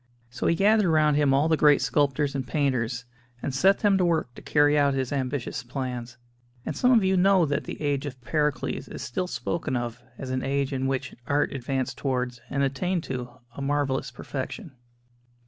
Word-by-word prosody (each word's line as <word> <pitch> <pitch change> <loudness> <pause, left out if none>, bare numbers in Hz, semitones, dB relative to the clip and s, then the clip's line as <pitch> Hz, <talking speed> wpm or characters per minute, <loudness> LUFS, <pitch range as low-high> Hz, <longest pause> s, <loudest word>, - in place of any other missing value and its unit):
So - - -2
he 170 - +3
gathered 205 0 +4
round 155 -2 +4
him 145 -2 +3
all 140 +3 +3
the 160 - +3
great 150 -2 +5
sculptors 145 0 +1
and 135 -3 -3
painters, 125 -4 -1 0.4
and 140 - -2
set 190 +9 +3
them 200 -2 +4
to 180 - +3
work 160 -7 0
to - - -12
carry 145 0 +3
out 140 -2 +3
his 130 0 -2
ambitious 130 -1 -2
plans; 125 -2 -5 0.5
and - - -3
some 250 - +3
of 230 -5 +5
you 190 0 +2
know 190 -1 +4
that 145 -1 -1
the - - -6
"Age 145 -1 -1
of 130 -2 -8
Pericles" 150 +2 -1
is - - -7
still 180 +10 -2
spoken 140 0 -3
of 120 0 -3 0.2
as 130 -1 -6
an 130 0 -1
age 140 0 -1
in 135 0 -1
which 135 -1 -2
art 145 +1 +1
advanced 130 -1 -3
towards 125 -3 -2
and 140 0 0
attained 165 +6 -1
to 125 -2 -4 0.3
a - - -6
marvellous 140 -1 0
perfection. 150 - -6
140 Hz, 195 wpm, -26 LUFS, 130-155 Hz, 0.5 s, great